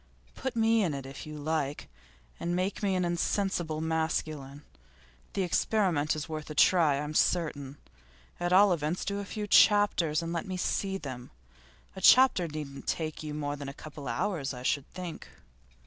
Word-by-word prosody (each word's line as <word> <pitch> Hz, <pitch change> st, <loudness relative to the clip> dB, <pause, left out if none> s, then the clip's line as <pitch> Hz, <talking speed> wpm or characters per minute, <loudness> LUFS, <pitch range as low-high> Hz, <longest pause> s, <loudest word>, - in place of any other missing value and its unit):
Put 265 Hz, -2 st, -4 dB
me 225 Hz, 0 st, +3 dB
in 160 Hz, -6 st, -1 dB
it, 135 Hz, -1 st, -6 dB
if 135 Hz, +3 st, -9 dB
you 155 Hz, 0 st, -7 dB
like, 150 Hz, -1 st, -2 dB, 0.5 s
and 175 Hz, +1 st, -1 dB
make 185 Hz, +2 st, -1 dB
me 195 Hz, -2 st, +1 dB
an 180 Hz, -1 st, +1 dB
insensible 175 Hz, -2 st, -1 dB
masculine. 155 Hz, -3 st, -2 dB, 0.7 s
The 195 Hz, -, 0 dB
experiment 175 Hz, -5 st, +1 dB
is 155 Hz, -, -4 dB
worth 155 Hz, -1 st, -6 dB
a 150 Hz, -, -6 dB
try 165 Hz, -5 st, +5 dB
I'm 150 Hz, +1 st, -4 dB
certain. 150 Hz, -5 st, 0 dB, 0.6 s
At 175 Hz, 0 st, -1 dB
all 195 Hz, +1 st, +6 dB
events 160 Hz, +2 st, -2 dB
do 200 Hz, 0 st, -2 dB
a 200 Hz, -, -5 dB
few 210 Hz, +1 st, -4 dB
chapters, 205 Hz, -7 st, +4 dB
and 165 Hz, 0 st, -4 dB
let 170 Hz, -, -3 dB
me 185 Hz, -1 st, -3 dB
see 195 Hz, +1 st, -1 dB
them. 130 Hz, -7 st, -8 dB, 0.7 s
A 190 Hz, -, -7 dB
chapter 250 Hz, -5 st, +6 dB
needn't 150 Hz, -3 st, -7 dB
take 155 Hz, -2 st, -2 dB
you 150 Hz, -1 st, -5 dB
more 145 Hz, -1 st, -2 dB
than 140 Hz, -1 st, -6 dB
a 140 Hz, -, -9 dB
couple 150 Hz, -2 st, -9 dB
of 115 Hz, -, -2 dB
hours 155 Hz, -10 st, -1 dB
I 125 Hz, -, -8 dB
should 140 Hz, +1 st, 0 dB
think. 180 Hz, -3 st, -7 dB
160 Hz, 180 wpm, -29 LUFS, 145-185 Hz, 0.7 s, all